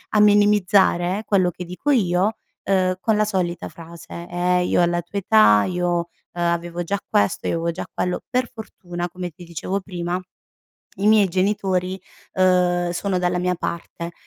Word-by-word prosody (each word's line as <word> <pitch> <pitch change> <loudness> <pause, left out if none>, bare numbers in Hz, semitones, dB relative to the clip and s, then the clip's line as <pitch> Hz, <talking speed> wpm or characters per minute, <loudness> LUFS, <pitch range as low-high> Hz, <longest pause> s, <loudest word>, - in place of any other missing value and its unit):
a - - +5
minimizzare 205 -2 +3
quello 185 -4 +2
che 180 - -8
dico 180 +12 -2
io, 200 -3 +2 0.3
uhm, 185 -1 +2
con 220 - +2
la 215 - +3
solita 185 -4 -2
frase: 170 +1 -10
"Eh 180 +1 +1
io - - +2
alla 175 0 +1
tua 185 +4 -5
età... 105 - +5
io, 180 -1 -1
uhm, 170 - -1 0.4
avevo 170 0 -1
già 200 +4 -2
questo, 100 - +1
io - - 0
avevo 165 0 -1
già 165 - -6
quello." 180 0 -2
Per 250 -1 0
fortuna, 175 -6 -6
come 180 0 -6
ti 170 +3 -14
dicevo 170 +3 -3
prima, 180 -2 -3 0.8
i 195 +2 -1
miei 210 -2 +5
genitori, 185 0 0 0.3
uhm, 180 -1 +2
sono 185 +2 -1
dalla 180 0 0
mia 180 0 0
parte. 170 0 -5
180 Hz, 165 wpm, -22 LUFS, 175-195 Hz, 0.8 s, a